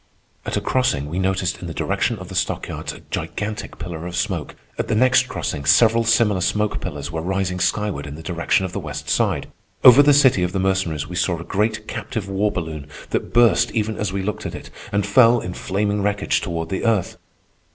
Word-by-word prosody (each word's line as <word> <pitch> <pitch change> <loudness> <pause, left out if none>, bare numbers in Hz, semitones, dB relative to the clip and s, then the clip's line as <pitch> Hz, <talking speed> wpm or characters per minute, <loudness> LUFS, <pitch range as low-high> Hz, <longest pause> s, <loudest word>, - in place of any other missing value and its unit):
At - - -1
a - - -1
crossing 100 - 0
we 90 - -2
noticed, 95 -1 -1
in 90 - -6
the 80 - -6
direction - - 0
of - - -9
the - - -9
stockyards, - - -2
a - - -12
gigantic 105 0 -4
pillar 85 0 -6
of 90 - -6
smoke. 90 -4 -2 0.2
At - - -1
the - - 0
next 130 +3 +4
crossing 70 - -3
several 110 +11 +4
similar 110 -4 +3
smoke 105 +3 0
pillars 75 -5 -5
were 80 -1 -3
rising 90 +1 -1
skyward 95 -6 -1
in 70 - -7
the 80 - -10
direction 90 +2 0
of 90 - -6
the 100 - -2
West 75 -3 -6
Side. - - +1 0.4
Over 125 +2 +10
the 145 0 +5
city 135 -8 +5
of 90 0 -1
the 95 - 0
Mercenaries 95 -6 0
we 90 - -7
saw 90 -1 0
a - - -6
great 105 +3 -1
captive 110 -8 -4
war 100 +2 0
balloon 80 -5 -5 0.2
that - - -2
burst 120 0 +4
even 110 0 -1
as 105 -2 -2
we 95 0 -2
looked 105 +1 -3
at - - -7
it, - - -10 0.2
and 100 0 +1
fell 115 +3 +5
in 90 - -5
flaming 100 +3 -1
wreckage 105 0 0
toward 85 -3 -4
the 95 - -3
earth. 110 -5 0
95 Hz, 215 wpm, -21 LUFS, 85-105 Hz, 0.4 s, Over